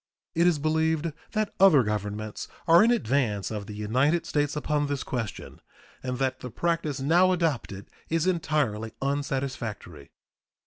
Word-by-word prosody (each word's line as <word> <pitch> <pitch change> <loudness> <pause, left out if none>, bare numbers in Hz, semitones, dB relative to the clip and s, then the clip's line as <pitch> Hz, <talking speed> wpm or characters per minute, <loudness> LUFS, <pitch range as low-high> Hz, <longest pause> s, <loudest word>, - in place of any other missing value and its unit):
It 170 +2 +3
is 175 -3 +3
believed 160 +1 0 0.2
that 215 -1 -1
other 185 -9 +7
governments 105 0 -4 0.2
are 170 +3 +7
in 230 - +4
advance 120 - 0
of 105 -2 -5
the 105 - -7
United 130 +11 +1
States 145 -1 0
upon 150 -1 0
this 140 -2 -2
question, 115 -4 -5 0.4
and 125 -1 -3
that 130 0 -1
the 125 - -7
practice 155 0 -1
now 175 +7 +4
adopted 145 - -1 0.2
is 165 0 +1
entirely 150 - 0
unsatisfactory. 130 - -3
140 Hz, 140 wpm, -27 LUFS, 110-160 Hz, 0.4 s, other